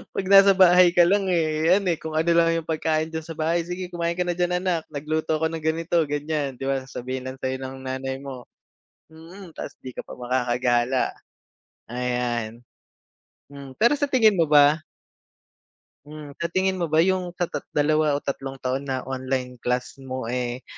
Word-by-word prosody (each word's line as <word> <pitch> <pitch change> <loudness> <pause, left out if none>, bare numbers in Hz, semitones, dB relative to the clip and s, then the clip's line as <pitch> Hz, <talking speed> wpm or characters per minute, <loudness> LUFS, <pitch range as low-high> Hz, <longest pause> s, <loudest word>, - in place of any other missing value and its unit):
'Pag 195 - -2
nasa 195 0 +8
bahay 180 -1 +7
ka 175 - +7
lang, 195 +1 +2
eh, 160 -2 +1
ayan, 195 +2 +3
eh, 165 - -1
kung 160 -1 -6
ano 165 +2 +2
lang 165 0 +4
'yong 165 - -10
pagkain 160 0 -1
diyan 160 0 -3
sa 165 -1 -8
bahay, 165 +2 0
"Sige, 180 0 -5
kumain 170 -1 -2
ka 180 - +1
na - - +1
diyan, 180 0 +1
anak. 175 -4 0
Nagluto 155 +2 -2
ako 160 0 0
ng 165 -1 -5
ganito, 165 +2 0
ganiyan." 145 -1 -2
'Di - - -6
ba 135 -1 0
sasabihin 130 0 -6
lang 130 +1 -7
sa'yo 130 0 -2
ng 130 0 -6
nanay 130 0 -3
mo. 130 -3 -8 0.7
Mm, 170 +2 -12
tas - - -7
'di 130 - -8
ka - - -4
pa - - -10
makakagala. 125 0 0 0.8
Ayan. 120 -2 -2 0.9
Hmm, 140 -1 -10
pero 235 +4 +5
sa 285 0 -1
tingin 220 -6 +4
mo 165 - +4
ba 145 +1 +5 1.3
Hmm, 150 -1 -10
sa 170 - -1
tingin 185 +1 0
mo 170 - 0
ba 155 +2 +4
'yong 185 -1 -1
sa 175 - 0
tat - - -4 0.2
dalawa 150 0 +2
o 145 - -7
tatlong 135 -1 -4
taon 135 +2 -2
na 130 -1 -2
online 130 -1 -4
class 125 +3 -2
mo, 130 -1 -5
eh, 125 0 -3
155 Hz, 190 wpm, -24 LUFS, 130-170 Hz, 1.3 s, nasa